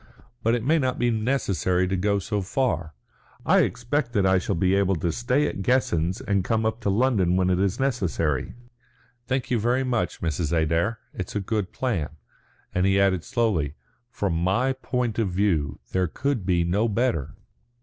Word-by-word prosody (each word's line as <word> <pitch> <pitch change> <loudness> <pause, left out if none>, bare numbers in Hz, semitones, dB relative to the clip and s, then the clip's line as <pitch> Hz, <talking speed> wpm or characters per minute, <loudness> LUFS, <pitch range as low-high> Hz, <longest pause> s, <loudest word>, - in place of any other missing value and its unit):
But 115 +1 +2
it 120 - -2
may 160 +4 +3
not 130 -2 0
be 120 0 +1
necessary 105 -6 0
to 95 - -1
go 100 +2 +1
so 100 +1 -2
far. 90 - -1 0.5
I - - +5
expect 125 0 0
that 100 -5 +2
I 95 0 +4
shall 95 +2 -2
be 95 +3 +2
able 100 -1 +2
to 85 +1 -1
stay 125 - +1
at - - -3
Guessens 95 -6 +1
and 100 -2 0
come 110 +2 0
up 110 +1 -1
to 105 - 0
London 100 -5 +2
when 90 0 +2
it 90 - +1
is 100 +4 0
necessary. 85 - -1 0.7
Thank 130 -1 -2
you 120 - +2
very 120 +4 +1
much, 120 -8 -1
Mrs. 80 -1 -2
Adair. 85 +8 +1 0.2
It 95 - -4
is - - -10
a - - +1
good 100 0 -2
plan." 100 - -1 0.6
And 90 +1 +2
he 95 0 +3
added 95 -3 +2
slowly, 85 - 0 0.3
"From 100 -7 -2
my 95 +11 +1
point 125 -3 -2
of 110 -4 +1
view 85 -7 0
there 95 -1 +1
could 130 - -2
be 90 -2 +3
no 100 +7 +1
better." 105 - -1
100 Hz, 185 wpm, -25 LUFS, 90-120 Hz, 0.7 s, I